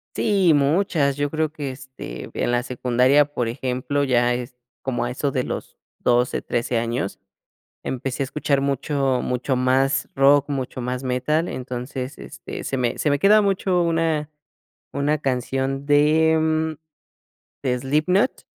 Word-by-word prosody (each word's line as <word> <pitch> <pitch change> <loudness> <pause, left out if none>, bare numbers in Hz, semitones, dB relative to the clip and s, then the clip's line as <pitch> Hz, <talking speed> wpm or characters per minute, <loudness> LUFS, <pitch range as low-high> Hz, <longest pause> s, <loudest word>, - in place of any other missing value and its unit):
Sí, 195 -6 +3
muchas, 145 -1 +2
yo 145 +1 -1
creo 155 0 -1
que, 145 -3 -5
este, 130 - -9
en - - -1
la 120 0 +1
secundaria, 125 +3 +3
por 120 -4 -1
ejemplo, 130 +3 -2
ya 125 -2 +2
es 125 0 -5 0.3
como 130 -2 -2
a 120 - -3
eso 140 +3 -1
de 130 -1 0
los - - -6 0.2
12, 125 0 +2
13 120 0 -1
años. 115 -3 -3 0.6
Empecé 130 +1 -3
a - - +1
escuchar 140 0 0
mucho 140 -1 0
mucho 125 +1 -1
más 130 +2 +2
rock, 140 +1 +4
mucho 130 -2 -3
más 125 +1 -3
metal, 130 +6 0
entonces, 125 +1 -5
este, - - -8
se 135 - -2
me 120 -2 -1
se - - +1
me 145 - +2
queda 210 +2 +6
mucho 190 -2 +1
una 165 -2 0 0.6
una 145 +2 +1
canción 135 0 -2
de 155 +2 +4
mm, 160 0 +1 0.9
de 125 -2 0
Slipknot. 155 - +1
135 Hz, 150 wpm, -22 LUFS, 125-150 Hz, 0.9 s, queda